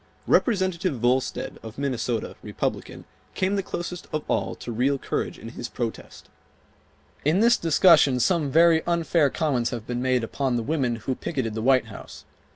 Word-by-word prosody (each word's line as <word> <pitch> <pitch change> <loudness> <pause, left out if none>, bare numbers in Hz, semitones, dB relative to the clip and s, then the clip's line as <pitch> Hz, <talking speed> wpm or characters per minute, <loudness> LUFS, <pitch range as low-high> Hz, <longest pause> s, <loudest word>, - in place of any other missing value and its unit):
Representative 185 - +1
Volstead, 125 +3 -1
of 110 0 -10
Minnesota, 125 -5 -2
Republican, - - -4 0.3
came 190 +2 0
the 200 - 0
closest 180 -1 -6
of 155 - -2
all - - -1
to 120 - -7
real 130 +5 +1
courage - - -3
in 115 - -9
his 120 0 -7
protest:— 115 -2 -6 1.0
"In 155 +6 +2
this 235 +2 +5
discussion 160 -5 +4
some 160 0 +1
very 165 +2 +5
unfair 170 -3 +2
comments 130 -6 0
have 115 -3 -6
been 120 0 -3
made 130 -2 +1
upon 130 +2 -1
the 120 - -1
women 130 -4 0
who 115 +4 -3
picketed 130 -5 -3
the 110 - -3
White 130 +1 +3
House. - - -11
135 Hz, 160 wpm, -25 LUFS, 120-170 Hz, 1.0 s, this